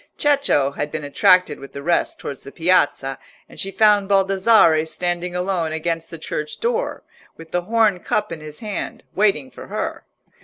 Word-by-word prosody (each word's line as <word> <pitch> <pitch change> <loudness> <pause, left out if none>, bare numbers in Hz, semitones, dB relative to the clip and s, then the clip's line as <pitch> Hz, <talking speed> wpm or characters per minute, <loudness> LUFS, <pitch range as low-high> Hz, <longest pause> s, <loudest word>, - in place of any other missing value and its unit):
Cecco 280 - +2
had 145 +1 -4
been 155 - -4
attracted 180 +5 +3
with 135 -1 -11
the 140 - -7
rest 170 +2 0
towards 140 - -6
the 140 - -10
Piazza, 160 -6 +1 0.3
and - - -12
she 195 - -2
found 205 -1 +3
Baldassarre 195 -4 +4
standing 175 +2 -3
alone 180 -3 -1
against 165 +1 -2
the 165 - -8
church 150 -1 -5
door, 475 +1 -1 0.3
with 165 0 -13
the 180 - 0
horn 215 -1 +2
cup 210 +2 -1
in 165 - -5
his 150 -1 -10
hand, 210 -3 -5
waiting 190 -10 +1
for - - -11
her. - - -4
175 Hz, 170 wpm, -21 LUFS, 155-200 Hz, 0.3 s, Baldassarre